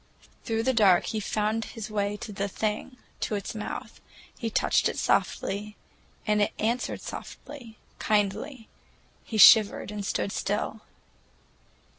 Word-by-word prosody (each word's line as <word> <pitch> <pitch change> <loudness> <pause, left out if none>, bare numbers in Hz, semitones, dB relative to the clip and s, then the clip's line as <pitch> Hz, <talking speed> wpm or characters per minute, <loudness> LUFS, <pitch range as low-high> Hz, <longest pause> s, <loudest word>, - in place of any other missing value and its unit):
Through 225 -1 0
the 260 +2 +2
dark 195 -6 +5
he 220 - -2
found 215 +2 -1
his 220 -2 -7
way 205 0 -1
to 220 - -6
the 200 +1 -2
Thing, 215 +5 -3 0.2
to 215 - -1
its 200 - -4
mouth. 215 -1 -6 0.3
He 230 - -3
touched - - +2
it - - -5
softly, 210 +2 0 0.5
and 210 -1 +2
it 205 - +1
answered 235 +3 -1
softly, 240 -7 -9 0.2
kindly. 215 +4 -1 0.6
He 220 - -4
shivered 210 0 +7
and 210 -1 -5
stood 200 - -1
still. 210 +2 -2
215 Hz, 135 wpm, -27 LUFS, 205-225 Hz, 0.6 s, shivered